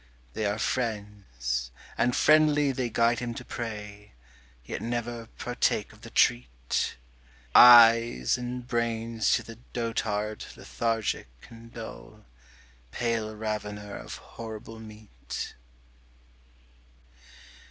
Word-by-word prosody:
They 110 - -1
are 105 +1 -1
friends; 100 - -3 0.3
and 125 0 +1
friendly 150 -2 +4
they 125 -2 -2
guide 115 0 +2
him 120 -1 -4
to - - -8
prey, 105 -3 -7 0.5
Yet - - -5
never 120 0 -3
partake 125 0 -1
of - - -19
the - - -10
treat - - +1 0.6
Eyes 115 - +8
and 125 0 -5
brains 115 -1 0
to - - +1
the 115 0 -11
dotard 110 -3 -2
lethargic 115 - -2 0.2
and 115 0 -13
dull, 115 -1 -10 0.6
Pale 110 - -2
ravener 105 -1 -4
of - - -7
horrible 110 0 -9
meat. 105 - -8
115 Hz, 100 wpm, -28 LUFS, 105-120 Hz, 0.6 s, Eyes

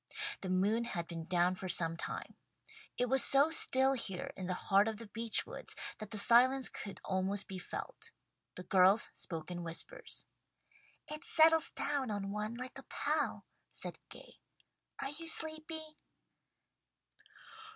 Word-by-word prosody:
The 190 - -5
moon 205 +6 +1
had 175 -7 -4
been 165 -1 -7
down 180 0 +2
for 185 0 -6
some 165 -1 +3
time. - - -5 0.6
It 250 - +1
was 265 +2 +4
so 280 +3 +5
still 265 -3 +6
here 195 -8 -4
in 185 - -6
the 180 - -2
heart 200 +3 +3
of 220 -1 -3
the 230 - -9
beech 225 +1 -1
woods - - -6 0.2
that 215 -1 -7
the 215 - -4
silence 250 +5 +6
could 200 - -8
almost 190 +1 -1
be 190 -2 -6
felt. - - -7 0.5
The 180 - -8
girls 190 +3 +4
spoke 165 -1 -4
in 175 0 -5
whispers. 170 - -4 0.8
"It 305 +2 -5
settles 320 -1 +5
down 280 -4 -2
on 200 -1 -3
one 210 +2 -3
like 255 +1 -7
a - - -12
pall," - - -1 0.2
said - - -7
Gay. - - -14 0.6
"Are 275 - -4
you 330 +3 -8
sleepy?" 315 -1 -1
215 Hz, 150 wpm, -34 LUFS, 185-270 Hz, 0.8 s, still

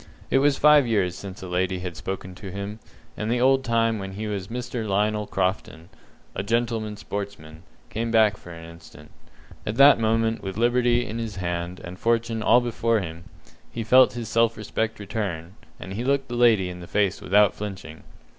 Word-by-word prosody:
It 135 - +4
was 145 0 +3
five 150 -3 +6
years 95 -6 +1
since 95 -1 -9
a - - -6
lady 90 +1 -1
had 90 -1 -6
spoken 95 +2 -6
to 95 +2 -9
him, 100 +3 -6 0.4
and 105 - -3
the 120 +1 +1
old 135 +1 +3
time 115 -2 +1
when 95 0 -6
he 105 +3 -5
was 100 -3 -4
Mr. 120 -1 -4
Lionel 105 +1 0
Crofton, 90 -3 -2 0.4
a - - -3
"gentleman 110 0 -1
sportsman", 100 -8 -7 0.3
came 115 +1 -2
back 110 -2 +4
again - - -15
for - - -12
an 80 -1 -10
instant. 75 -3 -14 0.5
At 105 - -3
that 140 0 +7
moment, 115 0 +1
with 95 0 -6
liberty 120 +1 +2
in 115 0 -5
his 115 -3 -5
hand, 85 0 -4
and 90 +2 -9
fortune 115 -1 0
all 120 +3 +5
before 115 -1 0
him, 85 -3 -7 0.5
he 115 - -4
felt 130 +4 +5
his 120 -2 -5
self 115 0 +2
respect 110 +1 -3
return, 95 -5 -4 0.3
and 95 - -7
he 115 +4 -3
looked 135 0 0
the 120 - -4
lady 115 -6 +4
in 90 - -9
the 85 - -10
face 100 -2 0
without 105 +2 +4
flinching. 95 -6 -7
105 Hz, 195 wpm, -24 LUFS, 95-115 Hz, 0.5 s, that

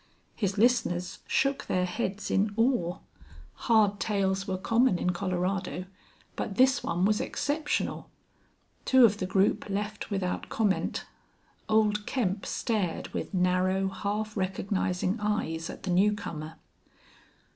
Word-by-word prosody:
His 200 -1 -1
listeners 205 -6 +1
shook 275 0 +1
their 180 0 +1
heads 190 +3 -3
in 205 +1 +1
awe. 225 -8 +2 0.7
Hard 210 -3 +4
tales 195 -2 0
were 190 -1 -1
common 230 +2 +2
in 180 - 0
Colorado, 185 0 -2 0.5
but 200 - -3
this 260 +3 +4
one 175 +2 0
was 210 +1 +2
exceptional. 295 +1 -2 0.7
Two 260 -2 +6
of 210 -2 +2
the 185 - -2
group 195 +2 +1
left 210 +2 -3
without 195 -3 -2
comment. 205 -4 0 0.6
Old 210 -1 +2
Kemp 205 -7 -1
stared 210 -8 -1
with - - -4
narrow, 185 +1 +1
half 210 +2 -3
recognizing 190 0 -1
eyes 185 -6 -1
at - - -9
the 190 - -2
new 200 +4 +4
comer. 160 -5 -6
200 Hz, 125 wpm, -28 LUFS, 185-215 Hz, 0.7 s, Two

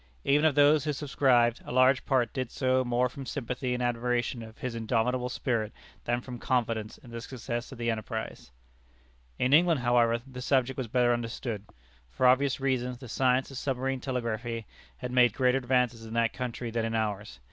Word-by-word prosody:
Even 145 +3 +3
of 155 -3 +3
those 145 0 +5
who 150 -1 -1
subscribed, 130 -4 +2
a - - -8
large 130 +1 +4
part 125 -4 +2
did 130 -3 -3
so 130 -1 +1
more 125 0 +1
from 135 +2 -8
sympathy 125 -1 -3
and 125 - -2
admiration 120 0 -1
of 110 0 -11
his 125 -2 -4
indomitable 120 +2 0
spirit 115 -4 -1 0.3
than 120 +1 0
from 125 -1 -8
confidence 115 -4 -1
in 120 - -15
the 115 0 -6
success 120 0 -5
of 130 - -9
the 120 0 0
enterprise. 110 -2 -5 0.9
In 130 +2 +1
England, 165 -2 +5
however, 120 -1 +3
the 130 -1 -9
subject 130 0 +1
was 130 -3 -3
better 120 +1 +3
understood. 115 -2 -4 0.4
For 60 - -1
obvious 130 +2 +4
reasons, 125 -2 -1
the 125 0 -10
science 130 +3 +1
of 135 - -5
submarine 135 -1 -1
telegraphy 115 -3 -3 0.3
had 125 -1 -5
made 125 -3 +4
greater 130 0 +3
advances 125 -2 +1
in 110 0 -7
that 115 -1 +2
country 120 -2 -4
than 115 0 -1
in 115 0 -2
ours. 105 -6 -3
125 Hz, 185 wpm, -29 LUFS, 115-130 Hz, 0.9 s, those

